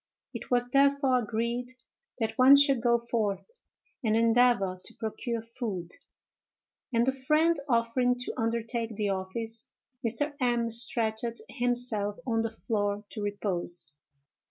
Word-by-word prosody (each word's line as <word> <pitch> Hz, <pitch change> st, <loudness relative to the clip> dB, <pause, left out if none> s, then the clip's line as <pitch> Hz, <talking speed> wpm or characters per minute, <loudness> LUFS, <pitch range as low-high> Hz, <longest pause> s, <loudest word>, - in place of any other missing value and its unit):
It -, -, -7 dB
was 245 Hz, -1 st, +2 dB
therefore 275 Hz, -1 st, +4 dB
agreed 235 Hz, +2 st, -2 dB, 0.4 s
that 220 Hz, -2 st, -1 dB
one 260 Hz, +3 st, +8 dB
should 280 Hz, -3 st, +4 dB
go 235 Hz, 0 st, +4 dB
forth 225 Hz, -, -2 dB, 0.5 s
and 220 Hz, -2 st, +2 dB
endeavor 230 Hz, -5 st, +3 dB
to -, -, -8 dB
procure 225 Hz, +1 st, -4 dB
food; 220 Hz, -7 st, -5 dB, 1.0 s
and 235 Hz, -1 st, +3 dB
the 265 Hz, -, +3 dB
friend 305 Hz, +5 st, +2 dB
offering 245 Hz, +1 st, +2 dB
to -, -, -3 dB
undertake 230 Hz, -1 st, -2 dB
the 205 Hz, -1 st, -1 dB
office, 220 Hz, +4 st, -4 dB, 0.4 s
Mr. 240 Hz, +6 st, 0 dB
M—— 240 Hz, -2 st, +1 dB
stretched 225 Hz, -1 st, 0 dB, 0.3 s
himself 240 Hz, -5 st, -1 dB
on 225 Hz, -3 st, +1 dB
the 225 Hz, -, -1 dB
floor 210 Hz, -2 st, -2 dB
to 215 Hz, -, -5 dB
repose. 180 Hz, -6 st, -2 dB
230 Hz, 130 wpm, -29 LUFS, 220-245 Hz, 1.0 s, one